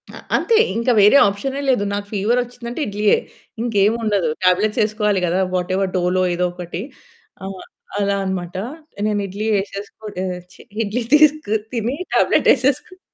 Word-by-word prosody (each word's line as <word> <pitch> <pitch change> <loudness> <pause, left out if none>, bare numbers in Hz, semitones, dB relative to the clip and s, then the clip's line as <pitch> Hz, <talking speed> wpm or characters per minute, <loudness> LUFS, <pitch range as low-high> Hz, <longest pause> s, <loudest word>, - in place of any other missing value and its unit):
ఆ! - - -9 0.2
అంతే 460 - +2 0.2
ఇంకా 235 +2 +1
వేరే 210 +7 +7
ఆప్షనే 265 +8 -3
లేదు. 245 -6 +2
నాకు 205 0 -3
ఫీవరొచ్చిందంటే 240 +4 -1
ఇడ్లీయే. 210 0 +2 0.4
ఇంకేమి 215 -2 +2
ఉండదు. 200 -7 +1 0.2
టాబ్లెట్సేసుకోవాలి 210 +2 +2
గదా! 175 +2 +1
వాటెవర్ 185 +1 0
డోలో 180 +1 +1
ఏదో 180 +1 +1
ఒకటి 175 0 -6 0.6
ఆహ్, 190 -1 -7 0.4
అలా 200 0 +1
అన్నమాట. 185 -2 -4 0.5
నేను 210 -1 0
ఇడ్లీ 205 +3 -4
ఎసేసుకుని 200 0 -8
ఆహ్, 180 -1 -4
ఛీ - - -15 0.2
ఇడ్లీ 215 +4 -2
తిసుకు 300 -7 +4 0.2
తిని 235 +2 -1 0.2
టాబ్లెట్ - - +3
ఏసేసుకొని 280 +7 -1
205 Hz, 135 wpm, -20 LUFS, 190-235 Hz, 0.6 s, వేరే